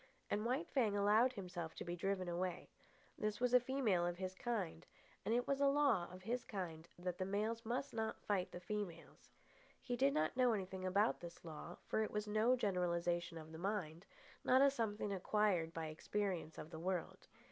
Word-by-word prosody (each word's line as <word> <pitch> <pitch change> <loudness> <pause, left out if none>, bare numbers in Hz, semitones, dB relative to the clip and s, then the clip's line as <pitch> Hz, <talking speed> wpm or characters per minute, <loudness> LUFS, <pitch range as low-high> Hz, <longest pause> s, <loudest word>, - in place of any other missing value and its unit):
And 210 +2 +1
White 270 +8 0
Fang 220 -7 +2
allowed 215 +5 +5
himself 180 -6 -5
to - - -5
be 175 0 -2
driven 185 +1 -1
away. 175 0 -2 0.5
This 210 0 -1
was 250 0 +2
a 250 - +9
female 245 -8 +1
of 175 0 -1
his 185 0 -3
kind, 190 -6 -2 0.4
and - - -1
it 245 - +2
was 275 0 +1
a 280 - +6
law 275 -11 +4
of 180 0 -10
his 240 +4 -1
kind 170 -5 -5
that 180 0 -3
the - - +1
males 215 +4 -1
must 250 +4 -1
not 220 -1 -2
fight 195 -3 0
the - - -6
females. 180 -3 -5 0.5
He 245 -2 -2
did 275 +3 +3
not 155 +7 +1
know 250 -2 +4
anything 190 -2 -3
about 200 +4 +3
this 170 +1 -9
law, 165 +2 -7
for - - +1
it 215 - 0
was 210 0 -2
no 215 +4 +4
generalisation 175 -5 0
of 160 0 -9
the 160 - -8
mind, 180 -3 -2 0.4
not 260 +2 +6
a 280 - +6
something 210 -5 -1
acquired 190 -3 +2
by 165 -1 -3
experience 170 +1 -2
of 155 - -7
the 160 - -6
world. 180 0 -3
195 Hz, 195 wpm, -39 LUFS, 175-225 Hz, 0.5 s, a